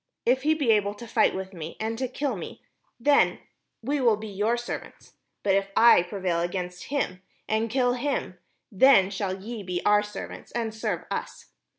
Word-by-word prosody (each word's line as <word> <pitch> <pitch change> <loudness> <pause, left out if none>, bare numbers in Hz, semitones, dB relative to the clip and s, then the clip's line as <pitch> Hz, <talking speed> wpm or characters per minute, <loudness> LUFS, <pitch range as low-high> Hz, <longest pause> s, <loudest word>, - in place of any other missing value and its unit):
If 255 +2 +3
he 310 +3 +2
be 280 -7 +2
able 205 -1 +2
to 235 - -9
fight - - +2
with 190 0 -5
me, 165 -2 -7
and 220 +1 -2
to 260 - -1
kill 275 +3 -2
me, - - -8 0.4
then 285 +4 +4 0.5
will 255 -3 +2
we 210 - -12
be - - -10
your 215 +5 +1
servants: 240 - -7 0.3
but 195 - +2
if 195 0 +2
I 235 -5 +7
prevail 180 -1 -2
against 180 +1 -4
him, 185 -10 -2 0.3
and 220 +1 0
kill 245 +1 +2
him, 250 -8 -2 0.3
then 200 -3 +5
shall 195 -1 -3
ye 220 +3 -6
be 180 -2 -3
our 210 0 +5
servants, 210 0 -8
and 230 -2 -2
serve 220 - -3
us." - - -5
215 Hz, 185 wpm, -26 LUFS, 190-245 Hz, 0.5 s, I